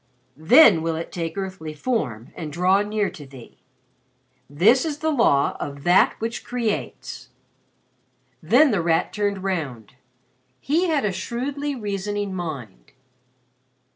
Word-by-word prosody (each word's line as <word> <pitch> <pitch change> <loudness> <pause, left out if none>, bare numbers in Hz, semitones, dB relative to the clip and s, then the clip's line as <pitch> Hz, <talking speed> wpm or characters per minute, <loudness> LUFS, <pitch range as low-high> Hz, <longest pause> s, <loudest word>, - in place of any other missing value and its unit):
Then 245 - +7
will 165 0 -1
it 165 +1 -6
take 165 -1 -4
earthly 185 -5 -5
form 145 - -3
and 155 -3 -6
draw 180 +5 +2
near 210 -1 -1
to 150 - -11
thee._ 130 -3 -14 0.9
"'This 205 - +4
is 310 -3 -3
the 315 +1 -1
Law 230 - +2
of 140 -1 -6
That 175 +2 +4
which 230 +1 -4
Creates.'" 205 - -4 1.1
Then 250 - +4
The 200 -5 +1
Rat 165 -1 0
turned 205 -2 -2
round. 140 - -4 0.7
He 330 +6 +1
had 305 -8 +1
a 205 - +1
shrewdly 270 +9 -4
reasoning 205 -2 -3
mind. 140 - -7
190 Hz, 130 wpm, -23 LUFS, 155-235 Hz, 1.1 s, Then